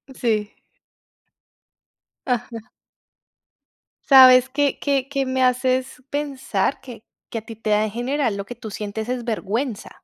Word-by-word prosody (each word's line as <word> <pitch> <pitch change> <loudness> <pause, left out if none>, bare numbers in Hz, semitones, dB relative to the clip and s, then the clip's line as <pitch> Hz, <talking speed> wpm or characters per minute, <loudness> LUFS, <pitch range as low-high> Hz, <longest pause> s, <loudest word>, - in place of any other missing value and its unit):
Sí. 215 -3 -1 1.7
Ajá. 240 -2 -3 1.4
¿Sabes 255 -1 +8
qué? 280 +1 0
¿Qué 275 -2 0
qué 275 -1 -1
me 260 0 0
haces 255 +1 0
pensar? 275 -6 -2
Que 245 -5 -11 0.3
que 230 - -3
a - - -13
ti 225 0 -11
te 215 -1 -3
da 210 0 +3
en 215 - -2
general 245 -2 -1
lo 200 - -5
que 245 - -8
tú 220 -3 -9
sientes 215 +3 -5
es 250 -2 -3
vergüenza. 225 +1 -3
245 Hz, 140 wpm, -22 LUFS, 220-265 Hz, 1.7 s, Sabes